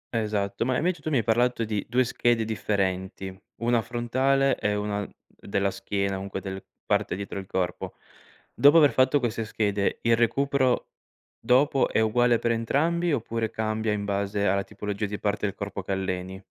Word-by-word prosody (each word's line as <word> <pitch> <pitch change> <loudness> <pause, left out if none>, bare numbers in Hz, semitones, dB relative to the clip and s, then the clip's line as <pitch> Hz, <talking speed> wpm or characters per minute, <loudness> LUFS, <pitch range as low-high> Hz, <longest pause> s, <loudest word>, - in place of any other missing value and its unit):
Esatto, 105 -2 -1
ma 130 +1 0
invece 175 -1 -1
tu 155 - -3
mi 140 - +2
hai 115 - +1
parlato 120 +1 +2
di 105 -2 -2
2 125 +2 +3
schede 120 -2 +1
differenti: 95 -3 -2 0.3
una 120 -1 +2
frontale 130 +4 +1
e 105 0 0
una 105 0 -2
d - - -21 0.4
della 100 -1 +1
schiena, 100 0 -2
comunque 95 0 -5
del 95 0 -6 0.2
parte - - 0
dietro 100 +1 -6
del 95 - -9
corpo. 90 -2 -3 0.6
Dopo 145 +3 +6
aver 150 -3 +6
fatto 130 +2 +3
queste 115 -2 -2
schede, 105 -2 -1
il 115 0 +4
recupero 130 +2 +1 0.5
dopo 135 +2 +3
è - - +1
uguale 120 +2 +3
per 120 - 0
entrambi 160 +9 +1
oppure 115 -4 -1
cambia 110 0 -1
in 100 -1 -2
base 100 0 -1
alla 100 0 +2
tipologia 105 0 -4
di 105 0 -4
parte 105 0 -1
del 100 - -5
corpo 100 -1 -5
che 95 - -3
alleni? 95 0 -4
110 Hz, 175 wpm, -26 LUFS, 100-125 Hz, 0.6 s, Dopo